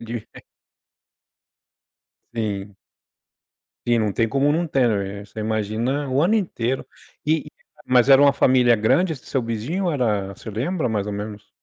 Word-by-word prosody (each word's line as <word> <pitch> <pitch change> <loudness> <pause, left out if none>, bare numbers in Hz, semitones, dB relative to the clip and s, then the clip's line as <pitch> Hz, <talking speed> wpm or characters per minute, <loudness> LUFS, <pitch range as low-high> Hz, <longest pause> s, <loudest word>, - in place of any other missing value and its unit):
Devi 115 -1 -6
é - - -11 1.9
Sim. 105 -3 -4 1.1
Sim, 120 -1 +3
não 105 -2 0
tem 115 - +2
como 135 +5 +2
não 165 +3 +1
ter, 100 -7 0
você 110 - -8
imagina 110 +6 -1
o 130 +2 +2
ano 185 +6 +3
inteiro. 135 - -1 0.4
E 155 0 +1
e - - -22 0.3
mas 125 0 +4
era 135 0 +8
uma 140 -1 +6
família 125 -3 +4
grande 160 - +2
esse 140 - -10
seu 135 - -1
vizinho 115 - -3
ou 175 - +1
era 105 -8 0
você 105 - -11
lembra 130 - -1
mais 105 -2 -1
ou 105 - -3
menos? 105 +1 -7
120 Hz, 160 wpm, -22 LUFS, 105-140 Hz, 1.9 s, era